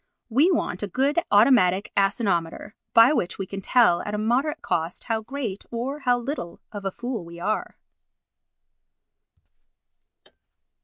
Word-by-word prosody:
We 275 +10 +4
want 305 - -1
a 205 - -2
good 270 - +1
automatic 205 -3 +4
asinometer 195 -2 0 0.2
by 230 +5 +7
which 180 - -2
we 195 - -4
can 195 +1 -7
tell 225 -5 +3
at 210 - -4
a - - -2
moderate 255 +8 0
cost 165 +1 -2
how 225 -2 -2
great 230 -4 -5
or 255 +5 -4
how 250 -3 +2
little 240 - -5
of 205 -2 -7
a - - +1
fool 240 -2 -5
we 170 0 -11
are. 215 +5 -3
220 Hz, 140 wpm, -24 LUFS, 195-255 Hz, 0.2 s, by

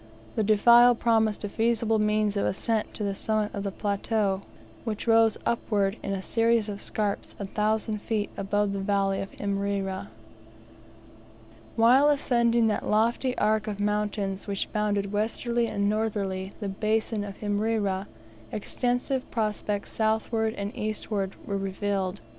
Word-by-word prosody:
The 220 - 0
defile 235 +4 +6
promised 225 -2 +1
a - - -1
feasible 225 0 +1
means 210 -1 +1
of 200 - +1
ascent 220 +2 -1
to 210 - -4
the 200 -1 0
summit 215 +1 -1
of 200 - -3
the 200 - -2
plateau, 200 0 0 0.4
which 220 -3 -4
rose 225 -1 +4
upward 205 -4 +1
in 200 - -4
a 190 -1 -3
series 230 0 +2
of 205 -1 -5
scarps 205 -2 -2
a 200 - -4
thousand 215 +1 -1
feet 215 -2 -2
above 205 +1 0
the 200 - -2
valley 195 0 +1
of 195 - -5
Imrera. 200 - -2 1.7
While 255 +6 +6
ascending 235 -5 +3
that 215 -2 0
lofty 235 +4 +1
arc 215 +1 +1
of 205 -1 -4
mountains 205 -1 -1
which 200 -1 -3
bounded 205 -2 0
westerly 235 +3 0
and 200 -2 0
northerly 200 -3 -1
the 205 -3 -3
basin 215 +1 0
of 200 -1 -8
Imrera, 205 -2 0 0.4
extensive 250 +4 -2
prospects 210 -2 -2
southward 220 0 0
and 200 +1 -4
eastward 210 -2 -2
were 200 - -2
revealed. 195 - -2
210 Hz, 140 wpm, -27 LUFS, 200-225 Hz, 1.7 s, defile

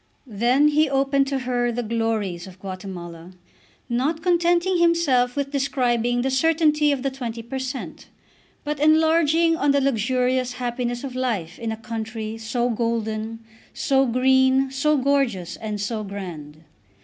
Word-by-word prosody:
Then 245 +6 +2
he 305 0 +2
opened 275 0 +2
to 275 0 -1
her 245 -2 -1
the 240 +1 -3
glories 220 -6 -2
of 185 0 -13
Guatemala, 185 -3 -8 0.5
not 275 +7 -1
contenting 350 +1 +2
himself 295 -8 +2
with 280 -1 -2
describing 245 -3 0
the 265 - 0
certainty 300 +1 +3
of 270 -2 -2
the 275 - 0
20 235 -3 -6
per 265 +3 -5
cent., 260 0 -6 0.6
but 295 -1 -3
enlarging 320 +1 +4
on 290 -2 0
the 280 0 +4
luxurious 255 0 0
happiness 245 0 -3
of 270 -2 -5
life 215 -10 -2
in 230 -1 -3
a 220 - -4
country 225 -1 -5
so 235 +2 -1
golden, 225 -1 -2 0.3
so 270 -1 +2
green, 260 +2 +3
so 300 +3 +1
gorgeous, 255 -10 0
and 215 -2 -5
so 215 +1 -3
grand. 165 -7 -8
250 Hz, 145 wpm, -23 LUFS, 225-280 Hz, 0.6 s, enlarging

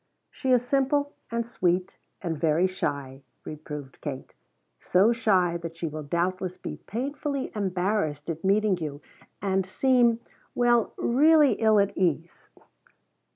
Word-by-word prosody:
"She 265 - -2
is 245 -1 +3
simple 285 +2 +1 0.2
and 235 0 -2
sweet 180 -5 -1 0.2
and 170 -3 -2
very 160 +3 +2
shy," 140 -7 -3 0.2
reproved 150 -3 -8
Kate. 135 -3 -6 0.5
"So 195 +5 +3
shy 190 -7 +2
that 165 -1 -8
she 170 - -4
will 155 -1 -4
doubtless 180 +4 -2
be - - -6
painfully 275 +4 -3
embarrassed 185 -6 -1
at 165 -1 -4
meeting 200 -1 +2
you, 150 -2 -5 0.4
and 190 -1 +1
seem 240 +3 +2 0.4
well, 240 -2 +2
really 295 +3 +5
ill 220 -2 +3
at 200 0 +1
ease." 170 -2 -2
190 Hz, 130 wpm, -26 LUFS, 165-235 Hz, 0.5 s, really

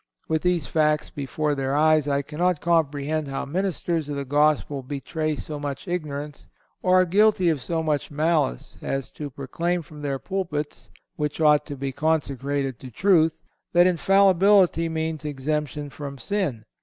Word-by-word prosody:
With 160 -1 0
these 180 -5 +1
facts 150 0 +1
before 150 +1 -2
their 135 0 -1
eyes, 155 -1 +4
I 140 0 +1
cannot 165 +4 0
comprehend 155 -2 0
how 135 0 -3
ministers 170 -1 -2
of 145 - -3
the 140 0 -3
Gospel 145 0 +2
betray 150 +3 -3
so 150 0 -6
much 145 +3 -5
ignorance, 150 -4 -4 0.3
or 185 0 +3
are - - +3
guilty 195 0 +4
of 155 -5 0
so 160 +5 -2
much 150 -2 -1
malice, 150 - 0
as 135 -1 -3
to 150 -1 -6
proclaim 170 +6 -2
from 150 -1 -12
their 140 -2 -2
pulpits, 155 -4 -4 0.3
which 150 0 -2
ought 150 -2 +4
to 145 -2 -6
be 135 0 -3
consecrated 140 -3 -1
to 130 - -9
truth, 165 - +3 0.4
that 175 0 +6
Infallibility 190 -1 +4
means 160 -1 -3
exemption 150 0 -3
from 140 -1 -7
sin. 150 - -2
150 Hz, 155 wpm, -24 LUFS, 140-170 Hz, 0.4 s, that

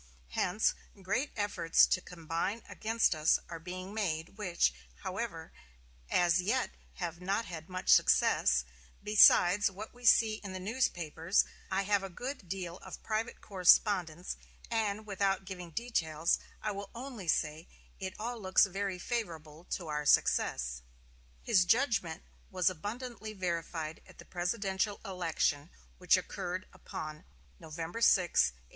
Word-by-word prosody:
Hence, 180 - +1 0.3
great 220 +10 -1
efforts 190 -5 +4
to 185 - 0
combine 170 +6 -3
against 225 -1 +1
us 155 0 +3
are 165 -1 -6
being 185 +3 -7
made, 170 -7 -2
which, 180 - +1 0.3
however, - - -4 0.6
as 175 0 +3
yet 235 +7 0 0.2
have 170 -1 -5
not 200 +5 0
had 170 -2 -8
much 185 0 -6
success - - +4 0.4
Besides 205 -2 +6
what 200 +3 -9
we 245 0 -17
see 220 -1 +5
in 195 -2 -6
the 185 - -5
newspapers, 180 - +1 0.2
I 195 +1 +1
have 200 0 +2
a 195 - -5
good 245 0 -6
deal 180 -2 -4
of - - -10
private 220 +2 -2
correspondence; 180 -3 +3 0.3
and, 215 -2 -1
without 195 -1 0
giving 180 -2 -7
details, 165 -6 0 0.2
I 215 - 0
will 200 0 -6
only 240 -6 -7
say 155 +1 0 0.3
it 190 0 -5
all 235 +1 -4
looks 185 0 +5
very 195 0 -3
favorable 170 -7 -5
to 180 - -4
our 150 -1 -2
success." - - +2 0.6
His 185 - +4
judgment 210 - +1 0.3
was 185 -1 +2
abundantly 215 +4 -6
verified 170 -4 -3
at - - -16
the - - -12
presidential 190 +2 -1
election, 165 -6 -1 0.3
which - - +4
occurred - - -4
upon 155 0 -7 0.4
November 165 +7 -6
6, - - +7
1860. 65 - +1
185 Hz, 135 wpm, -32 LUFS, 165-210 Hz, 0.6 s, 6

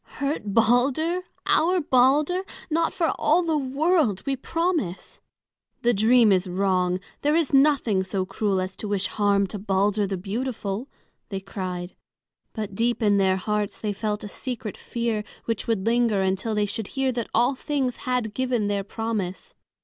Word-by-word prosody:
"Hurt 285 +2 -1
Balder! 250 - +2 0.2
our 360 +3 +3
Balder! 290 +5 +3 0.3
Not 330 +1 +2
for 330 -2 0 0.3
the 325 -1 +1
world, 275 - +1
we 275 - 0
promise! 325 - -2 0.6
The 240 0 +4
dream 225 +1 +5
is 185 0 +2
wrong, 185 -1 +1 0.2
there 295 +1 +2
is 325 -4 +1
nothing 270 -9 +4
so 190 0 -2
cruel 195 0 -1
as 185 0 -3
to 215 - -5
wish 200 -2 0
harm 200 -1 +2
to 200 +2 -6
Balder 200 +1 +1
the 195 -1 -2
beautiful!" 215 +2 -3 0.4
they 195 - -3
cried. 185 -2 -5 0.6
But 215 -3 -4
deep 235 +3 0
in 205 -1 +4
their 190 -1 +3
hearts 210 +1 -2
they 210 -2 -2
felt 210 +1 -3
a - - -5
secret 230 -1 -5
fear 230 -3 -2 0.2
which 230 -2 -2
would 220 -4 0
linger 230 -4 +2
until 190 +4 -1
they 210 0 +2
should 205 +1 -4
hear 270 -1 +2
that 235 -2 -3
all 240 +4 +3
things 265 -2 -2
had 250 -5 -2
given 250 -4 0
their 200 -1 0
promise. 220 - -4
220 Hz, 160 wpm, -25 LUFS, 195-260 Hz, 0.6 s, dream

